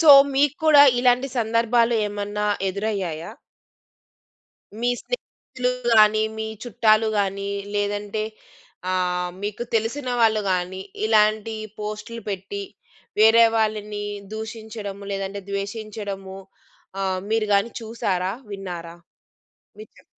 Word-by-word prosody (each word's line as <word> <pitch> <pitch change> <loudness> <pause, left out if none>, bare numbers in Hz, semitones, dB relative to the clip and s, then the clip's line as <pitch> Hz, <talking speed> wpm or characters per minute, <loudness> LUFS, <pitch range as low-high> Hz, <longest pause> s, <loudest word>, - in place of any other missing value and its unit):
So, 320 -3 +8 0.2
మీకు 285 +1 +3
కూడా 290 -2 +9 0.2
ఇలాంటి 250 +2 +3
సందర్భాలు 230 +1 +2
ఏమన్నా 205 0 -3 0.2
ఎదురయ్యాయా? 190 -5 -3 1.5
మీ 240 +1 +1
స్నేహితులు‌ 260 - -4 0.3
గాని, 215 0 +6 0.2
మీ 220 - -2 0.2
చుట్టాలు 220 -1 +3
గానీ 200 0 -1 0.2
లేదంటే 205 +1 -1 0.7
ఆహ్, 180 -1 0
మీకు 210 +3 -3
తెలిసిన 235 +5 -1
వాళ్ళు 220 -1 +4
గానీ 185 +1 -2 0.3
ఇలాంటి 215 0 +3 0.2
పోస్టులు 215 +2 -6
పెట్టి, 200 0 -4 0.6
వేరే 225 +1 +8
వాళ్ళని 210 -1 -1 0.3
దూషించడము, 220 -2 -6
లేదంటే 195 0 -4
ద్వేషించడము 200 -1 -5 0.6
ఆహ్, 190 -1 0
మీరుగాని 215 0 +2
చూసారా? 195 -5 -1 0.2
విన్నారా? 175 -4 -6 0.8
విన్నా 430 - -14
210 Hz, 95 wpm, -23 LUFS, 195-225 Hz, 1.5 s, కూడా